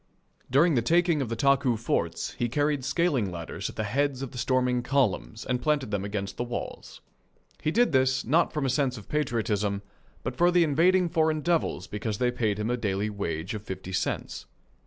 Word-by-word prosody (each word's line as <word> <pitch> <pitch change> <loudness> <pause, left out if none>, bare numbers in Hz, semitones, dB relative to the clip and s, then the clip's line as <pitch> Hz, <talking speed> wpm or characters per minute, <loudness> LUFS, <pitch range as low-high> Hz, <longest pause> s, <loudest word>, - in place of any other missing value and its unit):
During 155 +6 +4
the 120 - +3
taking 170 +3 +3
of 125 - -2
the 115 - -2
Taku 135 -2 +3
forts 115 - -1
he 120 - -2
carried 145 +1 0
scaling 140 - +1
ladders 85 -2 -5
at - - -10
the 110 - -2
heads 135 +4 0
of 135 - -6
the 125 - -7
storming 125 0 +1
columns 120 -4 0
and 125 -1 -1
planted 145 -5 0
them 100 -2 -1
against 100 -1 -4
the - - -1
walls. 120 0 -6 0.6
He - - 0
did 235 +6 +3
this, 130 -1 +2
not 165 +7 +3
from 150 -3 -2
a - - +1
sense 130 -2 0
of 105 - -11
patriotism, 105 -8 -1 0.4
but - - -3
for 175 +1 +4
the 175 -1 +4
invading 175 +4 +3
foreign 160 -2 +1
devils 170 0 0
because 105 0 -4
they 125 +1 +1
paid 110 -4 0
him 105 +3 -1
a 125 - 0
daily 105 -2 -1
wage 85 -3 -3
of 105 - -4
fifty 95 -2 -7
cents. 95 - -3
125 Hz, 200 wpm, -27 LUFS, 105-150 Hz, 0.6 s, During